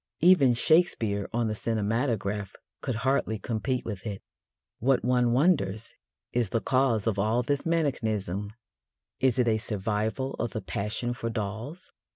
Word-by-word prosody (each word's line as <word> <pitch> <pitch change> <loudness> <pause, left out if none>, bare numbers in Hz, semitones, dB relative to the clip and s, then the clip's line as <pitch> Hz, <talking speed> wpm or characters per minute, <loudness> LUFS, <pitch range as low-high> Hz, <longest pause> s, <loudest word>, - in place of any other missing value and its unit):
Even 155 -8 +6
Shakespeare 115 - +2
on 120 0 0
the 110 - -1
cinematograph 110 -2 -1 0.3
could 130 - -2
hardly 130 -5 +1
compete 120 +5 -2
with 105 -1 -5
it. 100 -2 -5 0.6
What, 130 +2 +2
one 125 -1 +3
wonders, 120 - +1 0.4
is 120 -4 +1
the 115 - +1
cause 130 -4 +1
of 110 -3 0
all 110 +4 +2
this 140 +5 -1
mannequinism? 110 - -1 0.7
Is 130 -3 +2
it 125 -2 +3
a 110 -1 +2
survival 110 +5 -2
of 120 - -2
the 110 - -3
passion 105 +6 -2
for 115 -1 -4
dolls? 115 - -5
115 Hz, 145 wpm, -28 LUFS, 105-130 Hz, 0.7 s, Even